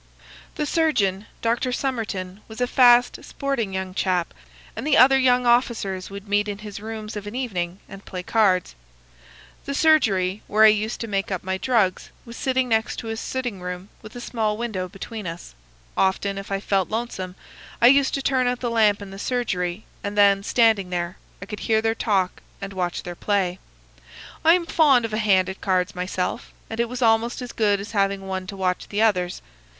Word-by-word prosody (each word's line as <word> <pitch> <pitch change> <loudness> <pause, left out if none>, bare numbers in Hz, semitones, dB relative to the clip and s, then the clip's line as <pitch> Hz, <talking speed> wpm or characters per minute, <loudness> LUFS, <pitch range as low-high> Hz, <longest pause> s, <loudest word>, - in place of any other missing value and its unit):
"The 300 - -1
surgeon, 225 - +1 0.2
Dr. 235 +2 +1
Somerton, 215 -8 -3
was 220 +1 -10
a 250 - +2
fast, 245 -1 +4
sporting 270 -8 -2
young 190 -1 -4
chap, 180 -3 0 0.4
and - - -4
the 305 - +4
other 270 +2 +7
young 250 -1 +3
officers 235 -6 +1
would 200 +1 -9
meet 205 +1 +1
in 205 -1 -4
his 210 -1 -8
rooms 215 0 -6
of 205 -1 -6
an 205 - -7
evening 185 -8 -3
and 195 0 -11
play 180 -1 -6
cards. 190 -4 +2 0.9
The 280 - -3
surgery, 210 - +3
where 215 +1 +4
I 220 - +10
used 215 +2 0
to 230 - -3
make 195 -2 -1
up 185 - -3
my 190 0 -2
drugs, 215 -7 +1 0.2
was 235 0 -9
next 250 -4 +1
to 230 - -7
his 225 0 -3
sitting 245 -7 -4
room, 180 +2 -6
with 215 +1 -12
a - - -6
small 220 -3 -1
window 210 -6 -3
between 210 +1 -7
us. 165 - -8 0.4
Often, 195 +1 +1
if 195 - -9
I 195 - 0
felt 195 -2 0
lonesome, 215 -5 -4 0.4
I - - +4
used 275 +2 +5
to 275 - -3
turn 260 -2 +2
out 245 0 0
the 240 -2 -2
lamp 210 -3 +3
in 195 - -10
the 195 - -9
surgery, 200 -6 -2 0.2
and 205 +1 -4
then, 200 -1 +5
standing 220 -3 +3
there, 175 0 -3 0.3
I - - -7
could 210 -2 -7
hear 220 -1 +2
their 225 0 +1
talk 195 -5 0 0.2
and 195 0 -6
watch 180 -2 -2
their 175 - -6
play. 190 -1 -1 0.8
I 330 +2 +7
am 355 -2 -1
fond 280 -8 +4
of 220 - -5
a 215 - 0
hand 190 -4 +3
at 190 +1 -7
cards 185 0 +1
myself, 180 +4 -3 0.2
and 225 - -5
it 235 -1 +1
was 250 +1 -3
almost 225 +1 +2
as 245 - -7
good 205 -2 +1
as 200 +2 -7
having 195 -2 0
one 190 -1 -4
to 200 - -7
watch 185 -1 -1
the 210 +2 0
others. 180 -5 +1
210 Hz, 195 wpm, -23 LUFS, 190-235 Hz, 0.9 s, I